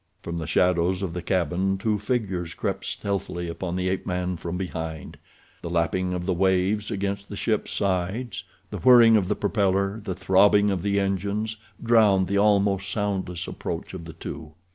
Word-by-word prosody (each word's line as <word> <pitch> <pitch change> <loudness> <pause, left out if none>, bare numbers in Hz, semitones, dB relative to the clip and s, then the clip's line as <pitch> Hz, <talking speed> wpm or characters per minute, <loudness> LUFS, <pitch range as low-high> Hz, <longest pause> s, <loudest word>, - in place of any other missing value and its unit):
From 85 0 -4
the 80 - -5
shadows 90 +1 +2
of 90 -4 -3
the 90 - -4
cabin 95 +2 0
two 105 +1 0
figures 95 -7 -2
crept - - -3
stealthily 95 -3 -3
upon 85 +1 -4
the 90 0 -1
ape 95 0 -1
man 90 0 -1
from 85 +1 -5
behind. 80 -4 -5 0.5
The 85 - -5
lapping 90 +2 0
of 90 -1 -4
the 95 - +1
waves 95 +3 +1
against 100 0 -3
the 100 - -6
ship's 110 +1 -1
sides, 100 +3 -2 0.3
the 105 - -4
whirring 120 +2 +7
of 100 -4 +2
the 105 - 0
propeller, 100 0 0
the 95 -4 -4
throbbing 100 +2 +4
of 95 -3 -1
the 100 +1 +1
engines, 100 +3 -1 0.3
drowned 110 -5 +4
the 100 +2 0
almost 100 -2 +2
soundless 95 -5 -2
approach 85 +2 -5
of 90 -3 -7
the 80 - -9
two. 80 -1 -8
95 Hz, 175 wpm, -25 LUFS, 90-100 Hz, 0.5 s, whirring